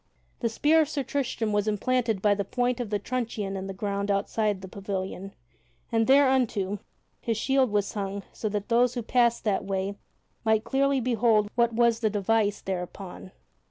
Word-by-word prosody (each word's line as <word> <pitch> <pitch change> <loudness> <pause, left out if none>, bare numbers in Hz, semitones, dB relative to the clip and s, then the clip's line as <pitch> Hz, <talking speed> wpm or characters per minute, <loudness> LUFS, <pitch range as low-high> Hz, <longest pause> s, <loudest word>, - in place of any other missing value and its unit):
The 235 - 0
spear 305 +8 +4
of 300 - 0
Sir 290 -3 -2
Tristram 245 -5 -2
was 205 0 +1
emplanted 225 -1 0
by 205 -1 +5
the 200 0 -1
point 245 +4 -1
of 240 -4 -3
the 205 - +1
truncheon 215 -3 -3
in 190 0 -4
the - - -4
ground 200 +1 -3
outside 205 0 0
the 190 - -8
pavilion, 195 0 -5 0.6
and 225 -1 +2
thereunto 260 -8 +3 0.4
his 230 -2 -2
shield 265 +2 +2
was 205 -1 0
hung 200 -1 -3
so 215 - -3
that 205 -1 -3
those 245 +1 +3
who 240 - -2
passed 235 0 +2
that 205 -3 0
way 195 +1 -3 0.4
might 220 -1 +2
clearly 270 +3 +1
behold 225 -3 +2
what 235 -1 +2
was 235 0 +3
the 220 -2 +1
device 205 0 +1
thereon. 185 0 -6
215 Hz, 175 wpm, -27 LUFS, 200-245 Hz, 0.6 s, by